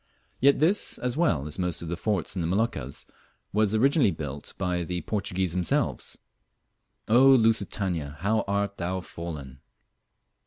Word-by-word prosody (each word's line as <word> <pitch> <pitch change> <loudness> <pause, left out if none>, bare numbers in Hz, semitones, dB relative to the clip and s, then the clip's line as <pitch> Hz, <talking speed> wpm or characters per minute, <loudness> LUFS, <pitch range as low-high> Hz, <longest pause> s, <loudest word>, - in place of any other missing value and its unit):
Yet 140 +2 +5
this, 170 +8 +2
as 125 0 -2
well 145 - +1
as 75 +5 -4
most 90 -2 -1
of - - -6
the 85 - -1
forts 100 0 -1
in 90 - -1
the 80 - -1
Moluccas, 90 - -2 0.5
was 105 0 +2
originally 135 +2 +4
built 75 -4 -6
by 90 -2 -1
the 90 +1 -3
Portuguese 95 -4 -2
themselves. 90 -1 -1 0.9
Oh! 125 +5 +6
Lusitania, 95 - 0
how 110 +3 +1
art 100 0 -1
thou 90 +1 -2
fallen! 75 -7 -8
95 Hz, 145 wpm, -27 LUFS, 85-110 Hz, 0.9 s, Oh